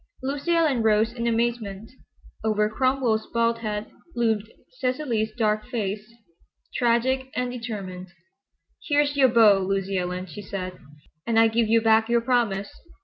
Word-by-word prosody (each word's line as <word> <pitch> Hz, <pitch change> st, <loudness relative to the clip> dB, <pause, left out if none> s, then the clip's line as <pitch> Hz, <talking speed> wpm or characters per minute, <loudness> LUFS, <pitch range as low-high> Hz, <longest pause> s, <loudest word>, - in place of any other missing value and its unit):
Lucy 285 Hz, +5 st, -1 dB
Ellen 305 Hz, -8 st, +2 dB
rose 220 Hz, +1 st, +2 dB
in 235 Hz, -1 st, -3 dB
amazement. 225 Hz, -3 st, -2 dB, 0.5 s
Over 210 Hz, -1 st, +2 dB
Cromwell's 255 Hz, -2 st, +1 dB
bald 230 Hz, 0 st, +1 dB
head 210 Hz, -2 st, -4 dB, 0.2 s
loomed 225 Hz, -2 st, 0 dB, 0.3 s
Cecily's 255 Hz, -4 st, -1 dB
dark 215 Hz, 0 st, 0 dB
face, 215 Hz, -3 st, -4 dB, 0.6 s
tragic 255 Hz, +2 st, +1 dB
and 250 Hz, 0 st, -1 dB
determined. 200 Hz, -7 st, -6 dB, 0.8 s
"Here's 290 Hz, -1 st, +2 dB
your 270 Hz, -2 st, +5 dB
beau, 220 Hz, -4 st, +6 dB
Lucy 195 Hz, 0 st, -1 dB
Ellen," 180 Hz, +1 st, -3 dB
she 190 Hz, +3 st, -9 dB
said, 185 Hz, -2 st, -6 dB, 0.5 s
"and 230 Hz, -1 st, +1 dB
I 225 Hz, -, +6 dB
give 225 Hz, 0 st, +1 dB
you 225 Hz, +1 st, +4 dB
back 220 Hz, 0 st, +3 dB
your 235 Hz, 0 st, +3 dB
promise." 230 Hz, -5 st, 0 dB
225 Hz, 140 wpm, -25 LUFS, 210-245 Hz, 0.8 s, beau